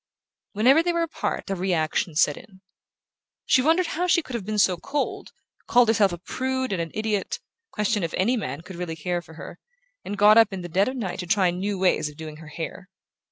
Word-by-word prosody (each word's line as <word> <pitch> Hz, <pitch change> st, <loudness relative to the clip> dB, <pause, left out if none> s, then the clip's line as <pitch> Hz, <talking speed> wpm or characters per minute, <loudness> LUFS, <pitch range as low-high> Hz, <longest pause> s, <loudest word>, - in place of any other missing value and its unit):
Whenever 255 Hz, +9 st, +5 dB
they 345 Hz, +1 st, 0 dB
were 340 Hz, -1 st, 0 dB
apart 330 Hz, -, -3 dB
a -, -, +2 dB
reaction 170 Hz, -3 st, -1 dB
set 150 Hz, -2 st, +3 dB
in. 190 Hz, -2 st, -15 dB, 0.8 s
She 260 Hz, -, +4 dB
wondered 325 Hz, +6 st, +3 dB
how 350 Hz, +2 st, -2 dB
she 345 Hz, -2 st, +3 dB
could 260 Hz, -, -10 dB
have 215 Hz, -5 st, -4 dB
been 215 Hz, 0 st, -2 dB
so 190 Hz, -3 st, +4 dB
cold, 280 Hz, -, -3 dB, 0.4 s
called 245 Hz, -2 st, +4 dB
herself 210 Hz, -4 st, +4 dB
a 175 Hz, -, -5 dB
prude 260 Hz, +5 st, -2 dB
and 175 Hz, -, -1 dB
an 165 Hz, -, -4 dB
idiot, 215 Hz, -2 st, -1 dB, 0.3 s
questioned 210 Hz, -2 st, -1 dB
if 165 Hz, -, -3 dB
any 225 Hz, +8 st, +2 dB
man 150 Hz, -, -4 dB
could 180 Hz, +1 st, -10 dB
really 175 Hz, -2 st, -4 dB
care 175 Hz, +2 st, -2 dB
for 160 Hz, -1 st, -15 dB
her, -, -, -10 dB, 0.4 s
and 205 Hz, -, -5 dB
got 210 Hz, +2 st, +7 dB
up 225 Hz, -2 st, +5 dB
in 190 Hz, -2 st, -5 dB
the -, -, -5 dB
dead 190 Hz, +4 st, +2 dB
of 260 Hz, -, -3 dB
night 210 Hz, -8 st, -4 dB
to 180 Hz, -, -5 dB
try 190 Hz, -2 st, +3 dB
new 195 Hz, +3 st, -3 dB
ways 185 Hz, -5 st, +1 dB
of 150 Hz, -, -15 dB
doing 155 Hz, -1 st, -8 dB
her 160 Hz, 0 st, -12 dB
hair. 165 Hz, +4 st, -7 dB
195 Hz, 220 wpm, -24 LUFS, 175-240 Hz, 0.8 s, got